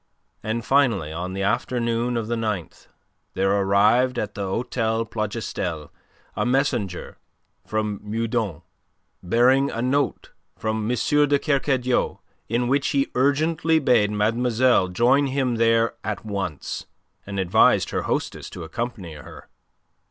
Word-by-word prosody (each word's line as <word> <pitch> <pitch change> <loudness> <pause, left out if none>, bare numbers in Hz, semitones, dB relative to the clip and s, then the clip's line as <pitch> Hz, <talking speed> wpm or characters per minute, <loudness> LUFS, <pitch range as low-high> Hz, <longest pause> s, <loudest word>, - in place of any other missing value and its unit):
And 115 +1 -3
finally 115 - +2
on 90 +3 -4
the 95 +1 -2
afternoon 120 +3 0
of 115 -2 -3
the 120 - -1
ninth, 105 -7 -4 0.5
there 95 +1 +2
arrived 105 +6 +3
at 110 - -2
the 100 - -6
Hotel 115 +2 -1
Plougastel 105 -8 -4 0.4
a - - 0
messenger 125 -8 -1 0.5
from 105 -2 -2
Meudon 110 - -2 0.6
bearing 125 +8 +3
a 115 - -5
note 130 +3 0 0.3
from 110 0 -2
M. 125 - 0 0.3
de 145 0 +3
Kercadiou 130 -7 0 0.3
in 120 +2 0
which 140 +2 +1
he 140 -1 0
urgently 155 +5 +2
bade 125 -8 +3
mademoiselle 115 +1 +2
join 125 +9 +3
him 130 -3 0
there 115 0 +3
at 105 +1 -4
once, 95 -8 -4 0.4
and 100 -1 -4
advised 90 -2 +3
her - - -1
hostess - - -3
to - - -8
accompany 100 -2 -5
her. 75 -2 -12
115 Hz, 130 wpm, -23 LUFS, 100-125 Hz, 0.6 s, arrived